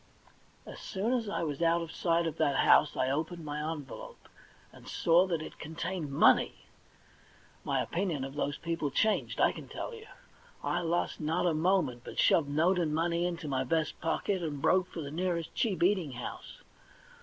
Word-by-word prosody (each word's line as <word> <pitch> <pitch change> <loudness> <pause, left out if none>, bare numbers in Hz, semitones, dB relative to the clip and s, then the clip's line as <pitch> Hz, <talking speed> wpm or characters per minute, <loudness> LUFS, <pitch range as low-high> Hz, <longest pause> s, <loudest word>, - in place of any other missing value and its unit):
As - - -9
soon 210 +5 -2
as 230 -4 -1
I 200 - -2
was 150 -1 -3
out 170 0 +3
of 165 - -8
sight 170 0 +1
of 165 -1 -3
that 145 -3 +2
house 150 - +5
I 130 +1 +1
opened 160 +3 -3
my 150 0 -4
envelope, 165 - -9 0.5
and - - -15
saw 175 +3 +3
that 165 -4 -1
it - - -10
contained 160 0 -4
money! 140 - +4 1.1
My - - 0
opinion 170 -6 -2
of 135 0 -6
those 145 0 -2
people 165 -3 -2
changed, 215 +10 0
I - - +5
can - - -9
tell - - -6
you! 445 -1 -10 0.6
I 175 - 0
lost 170 0 -1
not 160 +3 0
a 175 - +3
moment, 155 -7 +1
but - - -9
shoved 150 -4 +4
note 170 +6 +2
and 155 -3 0
money 170 +1 +1
into 170 -2 -5
my 130 -2 0
vest 155 +3 -1
pocket, 180 +3 0
and 150 -4 -3
broke 185 +6 +3
for 165 - -7
the 140 -2 -6
nearest 170 0 -2
cheap 200 -7 0
eating 180 -7 +2
house. 125 - -8
165 Hz, 185 wpm, -31 LUFS, 150-180 Hz, 1.1 s, house